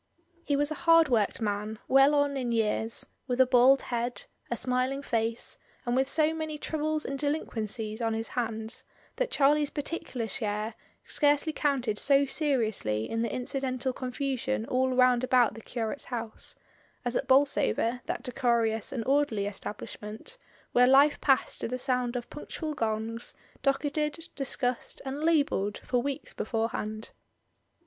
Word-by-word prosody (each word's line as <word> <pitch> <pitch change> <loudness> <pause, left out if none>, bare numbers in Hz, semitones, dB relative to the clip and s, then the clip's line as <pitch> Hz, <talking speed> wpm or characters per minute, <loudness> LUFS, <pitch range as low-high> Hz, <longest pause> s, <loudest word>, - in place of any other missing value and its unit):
He 290 - 0
was 290 +2 +1
a 310 - -5
hard 330 -2 +7
worked 225 -2 +1
man, 210 +1 -2
well 270 +2 +6
on 285 -1 +2
in 250 -3 -2
years, 225 0 0 0.2
with 250 -1 -1
a 260 - +8
bald 255 +2 +5
head, 240 0 -2 0.3
a 235 - -1
smiling 255 +3 0
face, 230 -2 -1 0.3
and 240 0 0
with 265 +1 +2
so 310 0 +3
many 315 -1 -4
troubles 310 0 -1
and 275 0 -3
delinquencies 225 -6 -2
on 225 -1 0
his 225 0 -4
hands 225 -1 -3 0.3
that - - 0
Charlie's 290 +1 +3
particular 285 -6 -3
share 215 -2 -2 0.3
scarcely 290 +2 +2
counted 260 -9 0
so 280 0 +4
seriously 220 - 0
in 225 - -2
the 230 -2 -1
incidental 255 0 -2
confusion 260 -2 -2
all 260 +2 +1
round 250 -1 +4
about 250 -3 +4
the 225 - -10
curate's 230 +3 -4
house, 230 -3 -4 0.5
as 245 0 -1
at - - -1
Bolsover, 260 -3 +3
that - - -3
decorous 235 -4 +1
and 235 -4 -3
orderly 270 -7 +2
establishment, 210 - -7 0.3
where 250 0 +5
life 280 +3 +5
passed 270 -2 +2
to - - -1
the 250 +2 -3
sound 250 -1 0
of 240 -1 -3
punctual 305 +1 -5
gongs, 225 -1 -3 0.3
docketed, 300 +3 -1
discussed, 255 -3 -2
and 270 +2 -4
labelled 285 -11 +2
for 245 -1 -1
weeks 275 +1 -4
beforehand. 220 -1 -3
255 Hz, 150 wpm, -29 LUFS, 225-280 Hz, 0.5 s, a